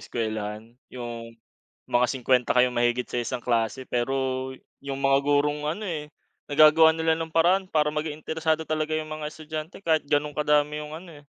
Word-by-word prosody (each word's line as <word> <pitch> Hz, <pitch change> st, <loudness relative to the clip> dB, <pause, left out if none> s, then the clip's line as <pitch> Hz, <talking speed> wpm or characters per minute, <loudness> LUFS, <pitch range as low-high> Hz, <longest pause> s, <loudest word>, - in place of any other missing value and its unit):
eskuwelahan, 110 Hz, 0 st, -4 dB, 0.2 s
yung 115 Hz, -2 st, -7 dB, 0.5 s
mga 125 Hz, +1 st, +3 dB
50 125 Hz, -1 st, +1 dB
kayong 125 Hz, 0 st, +4 dB
mahigit 120 Hz, +1 st, +1 dB
sa 120 Hz, -, -2 dB
isang 120 Hz, +1 st, -4 dB
klase 120 Hz, +2 st, 0 dB
pero, 130 Hz, +1 st, -1 dB, 0.3 s
yung 140 Hz, 0 st, -5 dB
mga 135 Hz, 0 st, +4 dB
gurong 145 Hz, +1 st, +1 dB
ano 205 Hz, +7 st, -3 dB
eh, 155 Hz, -6 st, -4 dB, 0.4 s
naga-gawa 155 Hz, +2 st, +6 dB
nila 160 Hz, 0 st, +1 dB
ng 160 Hz, -1 st, -5 dB
paraan 180 Hz, +4 st, +3 dB
para 150 Hz, -2 st, +1 dB
mag-interesado 155 Hz, +1 st, -2 dB
talaga 155 Hz, 0 st, -1 dB
yung 155 Hz, 0 st, -4 dB
mga 155 Hz, -1 st, -4 dB
estudyante 155 Hz, +4 st, -8 dB
kahit 160 Hz, -2 st, +2 dB
ganun 150 Hz, +1 st, +1 dB
kadami 150 Hz, 0 st, +2 dB
yung 150 Hz, 0 st, -8 dB
ano, 165 Hz, -3 st, -12 dB
eh. 145 Hz, -, -24 dB
150 Hz, 165 wpm, -26 LUFS, 125-155 Hz, 0.5 s, naga-gawa